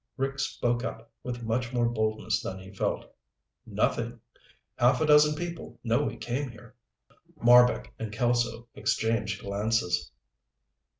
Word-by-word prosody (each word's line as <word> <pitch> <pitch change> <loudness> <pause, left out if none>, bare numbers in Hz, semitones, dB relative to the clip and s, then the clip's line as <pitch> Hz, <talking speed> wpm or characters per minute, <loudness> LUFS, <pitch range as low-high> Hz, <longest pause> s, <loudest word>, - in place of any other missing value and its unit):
Rick 135 0 -2
spoke 120 -2 0
up 115 -2 -6
with 120 -1 -5
much 120 +2 -1
more 120 -1 +2
boldness 110 -2 0
than 95 - -5
he 95 +1 -11
felt. 100 - -2 0.5
"Nothing. - - -1 0.6
Half 125 +2 +4
a - - +3
dozen 150 0 +6
people 170 +1 -6
know 115 +3 +2
we 145 - -2
came 130 +3 -3
here." 120 +1 -14 0.7
Marbek 125 +1 +5
and 110 -2 -4
Kelso 120 +1 0
exchanged 110 -2 -1
glances. 100 -2 0
120 Hz, 130 wpm, -28 LUFS, 110-125 Hz, 0.7 s, dozen